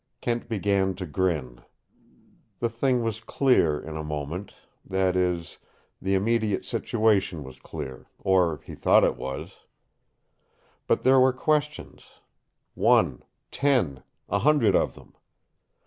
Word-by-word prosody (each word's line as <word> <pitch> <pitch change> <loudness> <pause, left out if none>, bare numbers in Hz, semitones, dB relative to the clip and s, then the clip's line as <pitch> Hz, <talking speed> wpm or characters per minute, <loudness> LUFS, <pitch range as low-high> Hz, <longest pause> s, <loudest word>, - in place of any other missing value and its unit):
Kent 120 0 -2
began 100 -3 +1
to 90 - -5
grin. 75 -8 -2 1.0
The 120 - -1
thing 120 +1 0
was 110 -1 -2
clear 115 - +2
in 80 0 -8
a 80 - -4
moment 75 +5 -5 0.3
that 95 -1 0
is, 90 -2 -1 0.4
the 95 +1 +1
immediate 110 0 0
situation 100 -7 0
was 65 -1 -12
clear 65 0 -8
or 90 -5 +1
he - - -9
thought - - +4
it - - +2
was. 65 0 -7 1.3
But - - +1
there 130 0 +6
were 130 0 +5
questions 150 +2 -2 0.6
one, - - +3 0.3
ten, 125 - +1 0.3
a - - 0
hundred 145 -7 +3
of - - +1
them. - - -17
95 Hz, 125 wpm, -26 LUFS, 80-115 Hz, 1.3 s, there